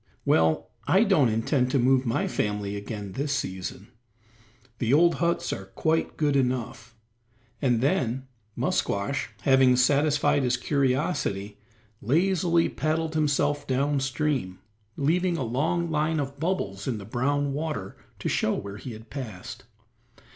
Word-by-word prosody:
Well, 80 0 +2 0.2
I 190 +8 +5
don't 160 - +4
intend 125 +4 +1
to 135 - +1
move 130 0 +3
my 115 - 0
family 105 -1 -2
again 100 -1 -6
this 140 +8 -2
season; 95 -4 -4 0.9
the 115 -1 0
old 170 +4 +5
huts 170 0 0
are 95 - -6
quite 160 +11 -1
good 145 -2 +1
enough;" 125 -3 -1 0.7
and 120 -4 +2
then 130 -1 0 0.3
Musquash, 100 +8 -1
having 130 -1 +5
satisfied 145 +3 +3
his 125 -1 +1
curiosity, 130 - -1 0.4
lazily 170 - +2
paddled 155 +1 -1
himself 145 -1 +1
down 140 +2 +1
stream 135 -8 -1 0.4
leaving 170 +4 +1
a 135 - -1
long 160 +8 0
line 155 +1 +1
of 140 0 -4
bubbles 105 - -2
in 125 -4 -1
the 100 - -8
brown 140 +5 0
water 140 -11 -4 0.2
to - - -4
show - - +1
where 100 0 -6
he 120 +3 -7
had 110 0 -12
passed. 110 -9 -7
135 Hz, 135 wpm, -26 LUFS, 115-150 Hz, 0.9 s, I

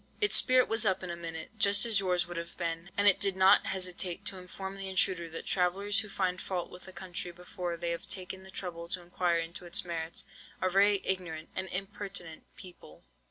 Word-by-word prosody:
"Its 415 -1 +3
spirit 255 -1 +5
was 225 0 +2
up 190 -3 +1
in 180 - -4
a - - -4
minute, 165 -1 -7
just 205 +2 +6
as 220 -3 +6
yours 180 -2 +1
would 175 - -7
have 170 0 -6
been, 170 0 -3
and 205 0 +4
it 200 - +6
did 195 -2 +2
not 190 0 +5
hesitate 185 0 -2
to 195 -2 -1
inform 190 +1 -7
the 195 -1 -4
intruder 185 -2 0
that 165 - -6
travellers 195 +3 +1
who 210 -1 -5
find 185 -2 -1
fault 180 -2 -4
with 180 - -12
a - - -9
country 185 0 -5
before 180 0 -6
they 170 0 -2
have 170 - -5
taken 190 0 -2
the 190 - -13
trouble 175 -3 -6
to 185 +1 -2
inquire 175 0 0
into 165 +1 -5
its 175 +1 +2
merits, 165 -1 -4 0.3
are 185 - 0
very 200 +1 +4
ignorant 170 -4 0
and 185 0 -1
impertinent 190 -3 -4
people. 180 - -13
185 Hz, 210 wpm, -30 LUFS, 170-195 Hz, 0.3 s, just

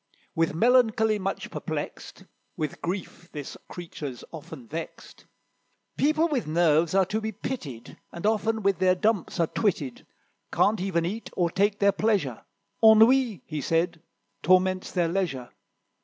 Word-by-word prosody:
With 165 -1 0
melancholy 220 0 +3
much 195 0 -4
perplexed - - -6 0.3
(With 155 -3 -4
grief 175 -1 -5
this 145 -2 -6
creature's 150 -7 -7
often 140 -6 -10
vexed). 165 +5 -8 0.7
"People 310 +3 +2
with 280 - -2
nerves 160 +1 +2
are 195 -1 +5
to 215 +4 -2
be 220 0 -3
pitied, 170 - -7
And 170 - -7
often 220 0 +1
with 195 -1 +2
their 185 -1 +4
dumps 205 -2 0
are 165 - +4
twitted; 155 - -2 0.4
Can't 210 -2 +2
even 175 -3 0
eat, 215 +6 -4
or 175 -2 +1
take 200 +3 +1
their 200 0 +4
pleasure; 195 - 0 0.4
Ennui," 220 - +6
he 155 -2 -4
said, 165 +3 0 0.4
"torments 185 0 +2
their 175 -2 +1
leisure. 165 -9 -2
185 Hz, 140 wpm, -26 LUFS, 165-220 Hz, 0.7 s, Ennui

